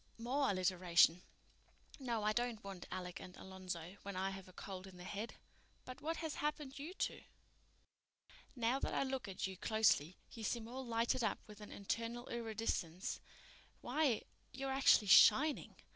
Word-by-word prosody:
"More 265 +5 +1
alliteration. 180 -2 +4 0.8
No, 235 -5 -1
I 215 0 +2
don't 240 -1 -1
want 195 -3 -7
Alec 180 -1 -5
and 180 - -10
Alonzo 185 -1 -6
when 200 -1 -6
I 190 +1 0
have 195 -1 -8
a - - -13
cold 190 0 -7
in 185 -1 -12
the 180 - -9
head. 205 +5 -5 0.5
But 255 - -8
what 325 +2 -2
has 320 -2 -3
happened 295 -2 -2
you 325 +7 -6
two? - - -2 1.3
Now 245 +2 +1
that - - -2
I - - +2
look 265 -3 -3
at 190 -2 -3
you 190 -1 -5
closely 205 -7 +3
you 225 - -8
seem 225 +1 -1
all 260 +3 -5
lighted 235 +1 +1
up 220 - +1
with 210 0 -12
an 210 - -9
internal 230 +4 -3
iridescence. 220 -6 -2 0.6
Why, 260 -3 +1 0.3
you're 270 +1 -3
actually 265 -6 +6
_shining! 285 +9 +6
220 Hz, 160 wpm, -38 LUFS, 190-255 Hz, 1.3 s, actually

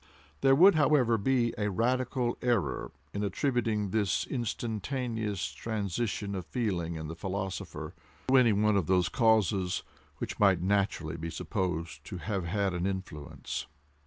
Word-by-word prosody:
There 135 0 +6
would 190 +7 +8
however 145 -6 +4
be 120 +1 +2
a 105 0 +1
radical 125 +3 0
error 115 - 0 0.2
in 100 - -2
attributing 110 -2 0
this 105 -4 +1
instantaneous 110 - -2
transition 100 +4 -2
of 95 -3 -5
feeling 90 -9 -1
in 80 -1 -5
the 80 - -5
philosopher, 95 0 -4 0.3
to 130 - +4
any 125 -3 +6
one 105 +1 +3
of 95 -6 +1
those 90 -3 +3
causes 100 -5 +2 0.3
which - - -5
might 95 -4 +5
naturally 95 -4 0
be 85 +1 -4
supposed 85 -3 -3
to 85 - -6
have 95 -1 -3
had 100 +2 0
an 90 +1 -1
influence. 95 -7 -5
100 Hz, 140 wpm, -30 LUFS, 90-115 Hz, 0.3 s, would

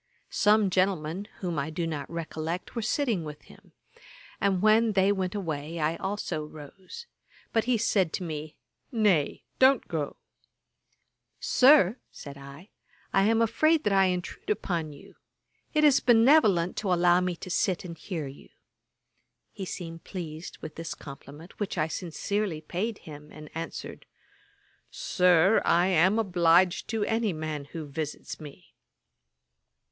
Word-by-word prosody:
Some 210 -2 +3
gentlemen, 185 0 0
whom 175 -5 -2
I 140 +3 -2
do 165 +2 -3
not 150 -4 -4
recollect, 165 +2 -5
were 230 - -1
sitting 225 - 0
with 150 -1 -9
him; - - -18 0.7
and 195 -2 +1
when 215 +2 +4
they 195 0 +3
went 190 -1 -2
away, 160 -4 -4
I 155 +1 0
also 190 -5 -3
rose; 155 - -11 0.5
but 225 -1 +2
he 250 -1 +2
said 195 -6 +1
to - - -3
me, 155 -2 -6 0.4
'Nay, 205 - +1 0.2
don't 260 -1 +5
go.' 150 -4 -3 1.2
'Sir, 255 - +5
(said 140 -2 -10
I,) 140 +7 -12 0.4
I 195 0 +4
am 225 +1 +3
afraid 310 +8 +2
that 205 - +1
I 195 0 +5
intrude 180 -1 -3
upon 175 -7 -1
you. 140 - -15 0.5
It 305 -1 +2
is 290 -3 +6
benevolent 225 - +4
to 200 -3 -1
allow 175 0 +4
me 180 -1 -1
to 180 +2 -8
sit 185 +1 0
and 170 -2 -7
hear 165 -2 -5
you.' 135 0 -11 1.0
He 195 - -6
seemed 165 -2 -7
pleased 165 -3 -7
with 155 - -8
this 165 0 -5
compliment, 145 +4 -12
which 205 -3 -3
I 155 -1 +1
sincerely 180 +2 -3
paid 200 +8 -3
him, 150 -1 -12
and 155 -1 -11
answered, 165 +1 -7 0.8
'Sir, 180 - +3
I 175 +1 +3
am 185 +4 +4
obliged 180 -3 +3
to 220 -2 -1
any 225 -3 0
man 155 -2 -4
who 155 +2 -7
visits 150 +1 -6
me.' 150 -2 -12
180 Hz, 145 wpm, -28 LUFS, 155-210 Hz, 1.2 s, is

